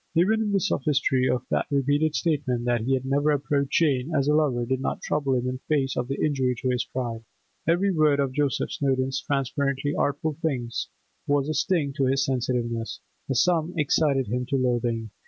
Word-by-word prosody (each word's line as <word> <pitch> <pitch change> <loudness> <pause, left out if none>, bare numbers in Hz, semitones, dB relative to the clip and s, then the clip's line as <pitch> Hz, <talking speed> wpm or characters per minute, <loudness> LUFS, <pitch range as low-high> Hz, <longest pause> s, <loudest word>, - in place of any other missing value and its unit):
Even 210 +5 +2
the 200 - +3
sophistry 135 -7 +1
of 125 -1 0
that - - +1
repeated 145 +2 +1
statement 135 -7 0
that 120 -1 +1
he 130 +4 +1
had 130 0 -3
never 140 +3 +1
approached 140 -1 0
Jane 145 -3 +2
as 140 -1 +2
a 150 - +3
lover 140 -6 +2
did 130 +2 -1
not - - -3
trouble 140 -3 0
him 125 0 -1
in 130 0 -3
face 140 -4 +1
of 120 - -2
the 135 +1 -3
injury 130 -4 +1
to 130 +2 -2
his 125 0 0
pride. 120 -3 -4 0.4
Every 180 +4 +3
word 155 -4 +3
of 135 -2 +1
Joseph 145 -1 0
Snowdon's 135 -1 0
transparently 140 +1 -1
artful 145 +1 -1
hints 125 -8 -2 0.4
was 145 0 +1
a - - 0
sting 155 -6 0
to 135 - +2
his 135 +1 +2
sensitiveness; 120 -3 -2 0.3
the 135 - 0
sum 170 +5 +2
excited 145 -2 +2
him 125 +3 -2
to 140 - -1
loathing. 120 -3 -1
135 Hz, 190 wpm, -25 LUFS, 125-150 Hz, 0.4 s, the